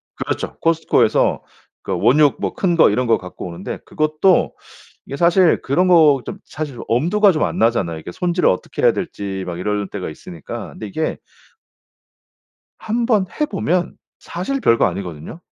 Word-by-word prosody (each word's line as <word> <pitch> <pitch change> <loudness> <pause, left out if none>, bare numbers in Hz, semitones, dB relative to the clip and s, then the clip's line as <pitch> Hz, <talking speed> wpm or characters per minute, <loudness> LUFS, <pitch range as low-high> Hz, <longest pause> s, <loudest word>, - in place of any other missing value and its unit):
그렇죠 - - -4
코스트코에서 165 -1 +2 0.4
그러니까 - - -3
원육 145 +1 +4
뭐 - - -2
큰 175 -3 +1
거 - - +6
이런 125 +4 0
거 115 - +4
갖고 90 -1 -9
오는데 85 +2 -7
그것도 155 +4 +1 0.5
이게 140 - -6
사실 175 +1 +4
그런 175 +7 +1
거 155 -6 +5
좀 - - -7
사실 145 -5 -6
엄두가 180 - +3
좀 155 - 0
안 - - -4
나잖아요. 105 -8 +1
이게 85 - -9
손질을 175 - +1
어떻게 90 - -3
해야 - - +6
될지 95 -1 -5
막 85 -1 -5
이럴 105 +1 -2
때가 95 -3 -5
있으니까. 80 +1 -9
근데 110 - -8
이게 155 +11 -3 1.6
한번 225 -3 0
해 300 - +3
보면 185 - -1 0.2
사실 190 +11 -4
별거 115 - +3
아니거든요. 90 - -5
150 Hz, 335 characters per minute, -19 LUFS, -, 1.6 s, 거